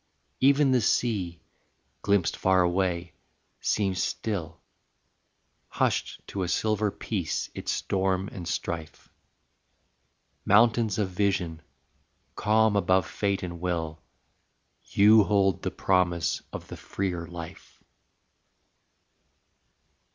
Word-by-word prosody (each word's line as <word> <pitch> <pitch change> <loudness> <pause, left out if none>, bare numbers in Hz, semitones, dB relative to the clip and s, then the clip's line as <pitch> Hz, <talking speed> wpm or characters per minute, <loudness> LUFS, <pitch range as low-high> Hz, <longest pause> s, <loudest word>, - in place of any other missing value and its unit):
Even 140 +1 +4
the 125 -2 +3
sea, 100 -7 0 0.6
glimpsed 100 -4 +1
far 95 -1 +3
away, 90 -1 -1 0.5
seems 95 -3 0
still, 85 -7 -3 1.1
Hushed - - -1
to 100 - -5
a 90 - -1
silver 105 +3 +1
peace 95 -3 -3
its - - -3
storm 95 0 0
and 90 -8 -7
strife. 80 -2 -5 1.3
Mountains 110 0 +4
of 105 -3 0
vision, 90 -4 -1 0.7
calm 110 +1 +2
above 95 -2 +3
fate 100 -2 -2
and 85 -1 -6
will, 80 -3 -3 0.8
You 105 +2 +6
hold 100 -2 +2
the - - -1
promise 90 -3 +1
of - - -7
the - - -7
freer 90 -4 -4
life. 85 -2 -10
95 Hz, 100 wpm, -27 LUFS, 85-105 Hz, 1.3 s, You